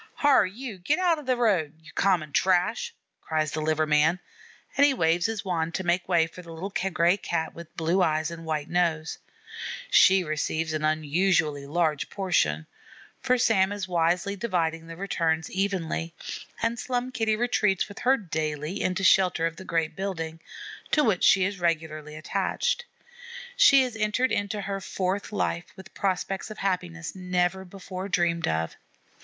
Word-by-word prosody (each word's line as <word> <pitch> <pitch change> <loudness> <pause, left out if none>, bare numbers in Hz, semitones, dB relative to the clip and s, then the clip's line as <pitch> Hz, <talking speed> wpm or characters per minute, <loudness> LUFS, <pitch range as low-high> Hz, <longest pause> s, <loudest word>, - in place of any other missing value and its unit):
"Hyar, 270 - +4
you, 220 0 -8
get 240 - +1
out 350 -3 +2
o' - - -7
the 255 -3 0
road, 185 -11 +1
you 160 - -15
common 175 -6 +1
trash," 190 - +1 0.3
cries 155 -1 -1
the 155 - -3
liver 155 0 +1
man, 155 +3 +3 0.6
and 280 - +4
he 285 -2 +5
waves 170 -1 +2
his 220 -2 -4
wand 170 -3 -1
to 190 - -2
make 175 +1 0
way 170 -3 +4
for 165 +2 -11
the 170 -1 -12
little 175 +5 -6 0.2
gray 170 +2 +3
Cat 160 -4 -2
with 170 -1 -12
blue 170 +4 +1
eyes 155 -1 +1
and 165 0 -8
white 155 -2 -2
nose. 165 -3 0 0.7
She 190 0 +6
receives 155 0 -2
an 155 -1 -2
unusually 155 -1 +1
large 155 -1 0
portion, 80 - 0 0.5
for 255 - +2
Sam 200 -5 +3
is 205 -2 -4
wisely 175 +3 +1
dividing 165 -6 -1
the 165 - -8
returns 165 -4 -1
evenly; 180 -4 -2 0.5
and 230 +1 0
Slum 250 0 -2
Kitty 220 -3 +1
retreats 215 -4 +1
with 200 - -10
her 265 +2 +3
'daily' 155 - -3
into 185 +1 -1
shelter 185 -3 +4
of 165 0 -2
the 190 - -9
great 165 -2 -1
building, 165 -5 -4 0.5
to 300 - +3
which 210 -8 +1
she 190 -2 +5
is 195 0 -3
regularly 155 -3 -2
attached. 485 - -1 0.7
She 275 - +7
has 250 -3 -4
entered 225 +4 +1
into 205 +1 -1
her 195 0 -4
fourth 190 +2 -2
life 175 -4 -1
with 190 -1 -13
prospects 195 +1 -2
of 215 - -8
happiness 175 -4 -2
never 180 0 -1
before 190 0 -7
dreamed 170 -2 +1
of. 80 0 -1
180 Hz, 165 wpm, -26 LUFS, 160-200 Hz, 0.7 s, She